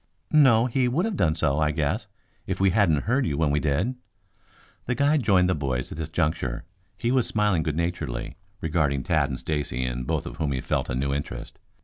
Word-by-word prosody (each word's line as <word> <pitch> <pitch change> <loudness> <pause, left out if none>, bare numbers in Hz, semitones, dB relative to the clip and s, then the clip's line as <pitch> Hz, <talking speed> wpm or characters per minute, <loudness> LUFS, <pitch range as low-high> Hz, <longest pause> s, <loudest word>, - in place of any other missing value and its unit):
"No. 130 -7 +6
He 125 +1 +1
would 150 - +1
have 225 -3 -2
done 80 - +2
so, 75 -3 +1
I 75 -1 +2
guess, 75 -1 -1 0.4
if - - -2
we 95 -1 +4
hadn't 85 -8 +3
heard 125 +6 +1
you 70 - -1
when 75 -2 +2
we 75 - +2
did." 80 - 0 0.9
The 125 - 0
guide 145 +3 +3
joined 95 -5 +4
the 90 - +2
boys 65 -5 -2
at - - -7
this 80 -1 -4
juncture. 80 -5 -1 0.3
He 120 0 0
was 130 -2 +2
smiling 105 -6 +1
good 75 -1 -2
naturedly, 85 -8 -3 0.3
regarding 75 -4 0
Tad 75 0 +1
and 65 - -3
Stacy, 75 -5 -2
in 60 0 -3
both - - -1
of - - -7
whom 75 -3 -1
he 65 - -2
felt - - -1
a - - -1
new 70 +2 -1
interest. 70 +1 -5
80 Hz, 215 wpm, -25 LUFS, 70-110 Hz, 0.9 s, No